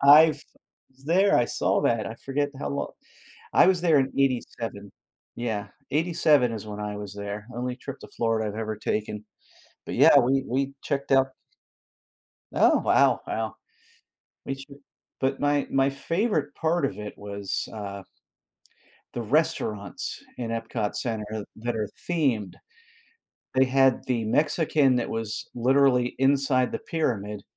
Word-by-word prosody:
I've 150 +1 +7 0.5
was 135 +1 -24
there, 190 +4 +4
I 120 - +4
saw 95 -4 +1
that, 115 -2 +1
I 110 - -5
forget 145 +1 -1
how - - -3
lo 140 - -3 0.6
I - - +6
was 185 -2 +3
there 165 -5 +4
in 135 0 +1
'87, 115 -6 -1 0.4
yeah, 110 -4 -3 0.2
'87 155 -5 +3
is 110 -1 -6
when 105 0 -6
I 105 0 -4
was 105 -1 -7
there, 100 +1 -6
only 125 +1 -3
trip 135 +1 -8
to - - -11
Florida 115 -2 +1
I've 105 - -6
ever 110 -1 -3
taken, 105 0 -3 0.6
but, - - -4
yeah, - - +7
we 135 +2 +2
we 135 +2 -1
checked 140 -1 -2
out 135 0 +5 1.3
Oh, - - +4
wow, - - +4
wow. - - -3 0.9
We 135 - -2
should 140 +1 -12 0.4
but 135 0 0
my 145 -1 +1
my 135 0 +3
favorite 155 0 -1
part 160 0 0
of 100 -6 -3
it 105 0 -7
was, 100 -1 -4
uh 100 -2 -6 1.1
The 120 - -2
restaurants 105 - -1 0.2
in 120 -2 -3
EPCOT 115 -2 -2
Center 110 -3 -3
that 120 +1 -3
are 105 -2 -2 0.2
themed. 125 - 0 1.0
They 130 0 +5
had 135 0 +3
the 120 -3 0
Mexican 145 +1 +2
that 120 - -1
was 115 -1 -3
literally 125 0 +3
inside 135 -2 +2
the - - -2
pyramid, 105 - -2
125 Hz, 145 wpm, -26 LUFS, 110-140 Hz, 1.3 s, I've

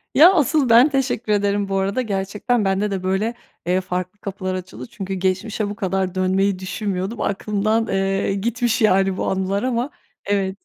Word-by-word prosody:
Ya, 335 +7 +8
asıl 295 -4 +2
ben 235 +6 +7
teşekkür 260 -5 -1
ederim 205 0 +1
bu 195 - 0
arada, 195 +6 0
gerçekten 210 +2 -1
bende 195 +2 0
de 190 -2 -3
böyle, 190 +5 0 0.3
eee, 180 +2 +1
farklı 180 +2 -4
kapılar 185 -2 -4
açıldı 185 0 -7
çünkü 195 -2 -5
geçmişe 190 +3 -1
bu 205 - -5
kadar 190 -1 -1
dönmeyi 190 +1 +1
düşünmüyordum, 190 +2 -3
aklımdan, 210 +2 0
eee, 195 0 0
gitmiş, 230 +3 0
yani, 195 -3 +3
bu - - -2
anılar 190 +2 -1
ama 250 +1 -1 0.4
evet. 195 -1 0
200 Hz, 165 wpm, -21 LUFS, 190-225 Hz, 0.4 s, Ya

